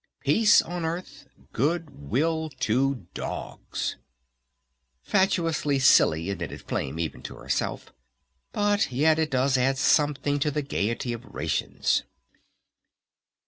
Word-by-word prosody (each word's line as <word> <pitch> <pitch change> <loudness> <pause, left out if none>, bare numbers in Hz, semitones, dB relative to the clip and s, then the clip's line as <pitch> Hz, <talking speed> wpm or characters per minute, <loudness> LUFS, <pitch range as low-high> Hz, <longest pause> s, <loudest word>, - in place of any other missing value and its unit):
"Peace 220 -2 +5
on 175 0 -5
Earth, 170 +3 -5 0.3
Good 145 - -2
Will 160 +4 0
to 130 -1 +1
Dogs." - - -5 1.1
"Fatuously 165 - +1
silly," 90 -9 +4
admitted 100 - -5
Flame 70 +3 -3
even 85 -1 -4
to - - -8
herself. - - -3 0.6
"But 205 -5 +1
yet 155 +5 +3
it 160 -1 +1
does 130 0 +2
add 135 +1 +2
something 145 0 +2
to 150 - +1
the 150 0 -2
Gayety 120 -1 -2
of 115 0 -7
Rations!" - - -1
145 Hz, 110 wpm, -26 LUFS, 125-160 Hz, 1.1 s, Peace